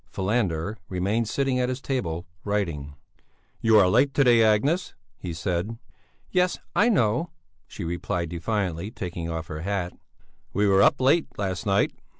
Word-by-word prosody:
Falander 95 -2 -1
remained 100 +5 0
sitting 135 0 0
at 125 0 +1
his 130 0 -3
table, 90 -12 -3 0.2
writing. 85 -9 -2 0.6
"You 115 -1 +5
are 100 -3 +6
late 135 +9 +3
to 140 - +5
day, 120 -3 +5
Agnes," 135 - +2 0.2
he 90 - -5
said. 90 +6 -2 0.5
"Yes, 180 -1 +2 0.2
I 220 +4 +4
know," 125 - +2 0.4
she - - -7
replied, 85 0 -2
defiantly, 90 0 -2
taking 85 -6 -5
off 80 0 -3
her 75 -1 -6
hat. 95 -1 -2 0.6
"We 105 +2 +2
were 100 -1 +5
up - - +4
late 140 +6 +3
last 95 0 -3
night." 100 0 +2
100 Hz, 155 wpm, -25 LUFS, 85-120 Hz, 0.6 s, are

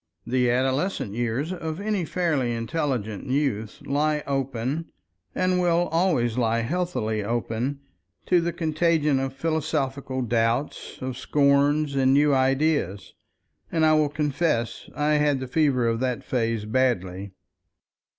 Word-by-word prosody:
The 125 -1 +1
adolescent 130 - 0
years 120 - -1
of 160 -2 -5
any 205 -4 -1
fairly 150 -8 0
intelligent 115 - -2
youth 130 -6 -1
lie 150 +1 0
open, 135 +2 -2 0.5
and 185 0 +1
will 175 0 +2
always 155 -9 +1
lie 115 -1 +1
healthily 115 - -1
open, 120 +5 -2 0.4
to 180 -1 +3
the 170 +1 -1
contagion 155 -3 +1
of 135 0 -2
philosophical 140 -4 -2
doubts, 115 +4 -1
of 130 -1 -4
scorns 145 +1 +2
and 135 -1 +3
new 145 0 +4
ideas, 135 - +1 0.6
and 160 -1 +2
I 155 - +5
will 155 -1 +3
confess 150 -4 -1
I 150 +1 +1
had 145 -2 +2
the 130 - -4
fever 130 -4 +2
of 115 0 0
that 125 -1 -1
phase 115 -3 -1
badly. 100 -6 -1
135 Hz, 130 wpm, -25 LUFS, 120-155 Hz, 0.6 s, I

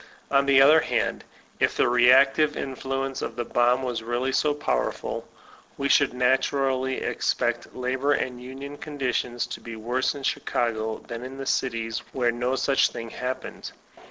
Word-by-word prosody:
On 140 0 +3
the 135 -1 +6
other 150 +4 +7
hand, - - -1 0.4
if - - +1
the - - +4
reactive 135 +5 +5
influence 135 0 -3
of - - -4
the 120 0 -3
bomb 120 +2 +2
was 125 -3 -2
really 120 +3 -1
so 150 +3 +2
powerful, 145 0 -2 0.5
we 140 0 -1
should 140 0 +4
naturally 130 +1 +1
expect - - -1
labor 130 +3 0
and 125 -3 -2
union 135 +3 -8
conditions 125 -4 -2
to - - -8
be 115 -1 -8
worse 120 +5 -1
in 140 - -8
Chicago 110 -4 -1
than 115 +1 -6
in 130 +1 -8
the 135 - -5
cities 115 -4 -1
where 120 -2 +1
no 120 +2 -1
such 135 +1 +2
thing 115 -1 -7
hap 125 +1 -4
pened. - - -8
130 Hz, 160 wpm, -25 LUFS, 120-135 Hz, 0.5 s, other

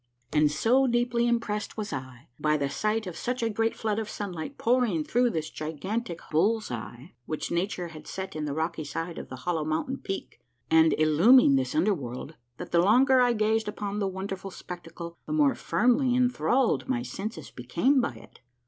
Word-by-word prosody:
And 150 -1 +4
so 250 - +3
deeply 240 0 +1
impressed 220 -3 -1
was 210 -6 -4
I 130 -2 -7
by 155 0 +2
the 140 -1 -1
sight 215 +1 0
of 180 -3 -6
such 250 +4 -2
a 225 - +1
great 225 +2 0
flood 215 -1 -1
of 215 -1 -4
sunlight 200 - -5
pouring 230 -9 +2
through 245 +8 +2
this 160 -7 -3
gigantic 170 +5 -4
hull's 215 - +1
eye 120 +6 -7
which 155 - -3
nature 175 0 -1
had 155 -2 -11
set 190 -2 -6
in 155 -1 -2
the 145 - -2
rocky 160 0 -2
side 165 +3 -5
of - - -9
the 130 - -6
hollow 170 -3 0
mountain 160 - -2
peak 195 -1 -6 0.3
and 160 0 +5
illumining 155 - +6
this 130 0 0
under 185 +7 +3
world, 130 -1 -6 0.2
that - - -8
the 170 - +4
longer 255 +7 +5
I 245 -1 +4
gazed 220 0 +1
upon 205 -1 -3
the 200 - 0
wonderful 190 0 -5
spectacle 170 -2 -9
the - - -3
more 295 -3 +4
firmly 250 +2 +2
inthralled 250 0 +2
my 245 -2 0
senses 195 - -6
became 175 - +1
by 145 - -2
it. 110 - -15
195 Hz, 185 wpm, -27 LUFS, 155-235 Hz, 0.3 s, illumining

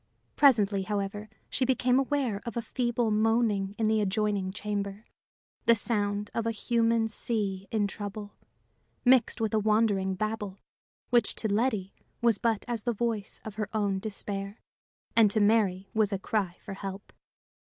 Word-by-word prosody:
Presently, 210 -8 +4
however, 205 +1 -3 0.2
she 265 - 0
became 255 0 +3
aware 270 -7 0
of 235 0 -5
a - - +1
feeble 240 -2 0
moaning 215 -2 +2
in 220 - +1
the 220 0 +3
adjoining 205 -1 0
chamber, 205 0 -4 0.6
the 235 - +7
sound 205 -2 -1
of 230 0 -1
a - - +2
human 230 0 +1
sea 205 -3 -2
in 215 -2 +1
trouble 205 0 -6 0.7
mixed 245 -1 +4
with 220 -2 -1
a 220 - +3
wandering 210 -3 +2
babble, 210 -1 -3 0.5
which 240 -1 +3
to 220 - -1
Letty 210 -2 0 0.3
was 235 -4 +3
but 225 -3 0
as 235 -3 -2
the 240 +2 -1
voice 220 -2 -2
of 215 -1 -7
her 215 -2 -2
own 200 -2 +1
despair, 200 0 -5 0.6
and 225 -2 +6
to 215 - +1
Mary 205 -3 +2
was 215 -2 +2
a 195 - 0
cry 190 -2 -2
for - - -5
help. 195 0 -7
215 Hz, 155 wpm, -29 LUFS, 200-230 Hz, 0.7 s, the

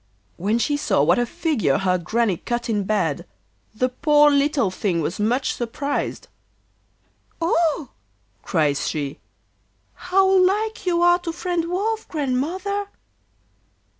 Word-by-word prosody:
When 205 +6 0
she 290 +5 0
saw 215 - +1
what 170 +8 +3
a 240 - 0
figure 230 - 0
her 185 -1 +1
Granny 210 +2 0
cut 240 +3 -3
in 205 -2 0
bed, 175 -7 0 0.5
the 255 +3 +1
poor 295 +3 +4
little 280 -6 +2
thing 185 -2 -1
was 165 +4 -3
much 240 +6 0
surprised. 280 +4 -3 1.1
'Oh!' 330 -3 +1 0.5
cries 150 -4 0
she, 145 -3 -3 0.7
'how 380 +2 +2 0.2
like 420 +2 0
you 345 -1 +2
are 350 0 +5
to 350 -2 -4
friend 345 0 -2
Wolf, 430 +5 -2
Grandmother! 335 +9 -2
275 Hz, 125 wpm, -22 LUFS, -, 1.1 s, are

